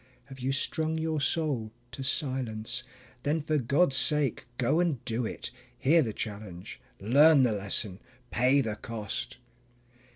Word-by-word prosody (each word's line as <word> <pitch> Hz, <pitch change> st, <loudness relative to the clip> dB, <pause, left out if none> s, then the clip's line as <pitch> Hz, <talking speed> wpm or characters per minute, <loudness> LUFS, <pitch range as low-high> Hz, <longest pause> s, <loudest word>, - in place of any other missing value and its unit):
Have 135 Hz, -1 st, -10 dB
you 130 Hz, +2 st, -1 dB
strung 160 Hz, +3 st, -1 dB
your 160 Hz, -1 st, -1 dB
soul 140 Hz, -6 st, 0 dB, 0.2 s
to -, -, -7 dB
silence? 130 Hz, -3 st, -2 dB, 0.4 s
Then 145 Hz, +4 st, 0 dB
for 155 Hz, 0 st, 0 dB
God's 140 Hz, +4 st, +2 dB
sake 145 Hz, -3 st, +3 dB
go 135 Hz, +6 st, +2 dB
and 165 Hz, -9 st, 0 dB
do 115 Hz, -1 st, -1 dB
it; -, -, -6 dB, 0.3 s
Hear 160 Hz, +7 st, +4 dB
the 115 Hz, -7 st, -1 dB
challenge, 100 Hz, -4 st, -7 dB, 0.2 s
learn 140 Hz, +7 st, +6 dB
the 120 Hz, -, +3 dB
lesson, 100 Hz, -1 st, -2 dB, 0.3 s
pay 130 Hz, +4 st, +4 dB
the 110 Hz, -4 st, -3 dB
cost. 115 Hz, +2 st, -5 dB
130 Hz, 140 wpm, -29 LUFS, 110-150 Hz, 0.4 s, learn